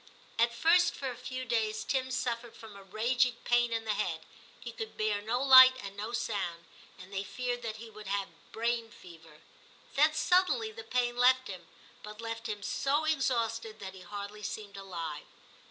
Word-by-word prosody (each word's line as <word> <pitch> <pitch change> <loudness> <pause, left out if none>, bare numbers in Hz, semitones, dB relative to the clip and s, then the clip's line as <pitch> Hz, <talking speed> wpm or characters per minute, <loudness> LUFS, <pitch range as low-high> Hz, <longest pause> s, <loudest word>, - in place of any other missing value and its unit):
At 235 +1 +4
first 340 +8 +4
for 270 -2 -3
a - - -8
few 255 +1 -6
days 220 -2 0
Tim 260 -1 -1
suffered 235 -2 -3
from 220 -2 -12
a 200 - -11
raging 235 +5 +1
pain 240 0 +3
in 225 -1 -2
the 215 - +1
head; 165 -5 -2 0.4
he 235 - -7
could 220 -1 -7
bear 215 -1 0
no 240 +5 -1
light 260 -1 +10
and 200 -4 -8
no 210 +3 -5
sound, 185 -8 -3 0.3
and 185 +2 -13
they 195 0 -2
feared 245 +3 -3
that 225 -2 -4
he 225 +1 -9
would 215 -1 -11
have 200 0 -4
brain 230 0 -1
fever. 165 -7 -15 0.5
Then 305 +2 +4
suddenly 370 +7 +2
the 455 +1 -9
pain 245 - 0
left 255 +1 +4
him, 185 -4 -8 0.3
but 210 0 -10
left 230 0 -5
him 205 -1 -4
so 285 +8 0
exhausted 230 -7 0
that 190 -1 -7
he 190 - -12
hardly 205 +3 -7
seemed 205 -1 -6
alive. 170 -6 -6
225 Hz, 185 wpm, -31 LUFS, 200-250 Hz, 0.5 s, light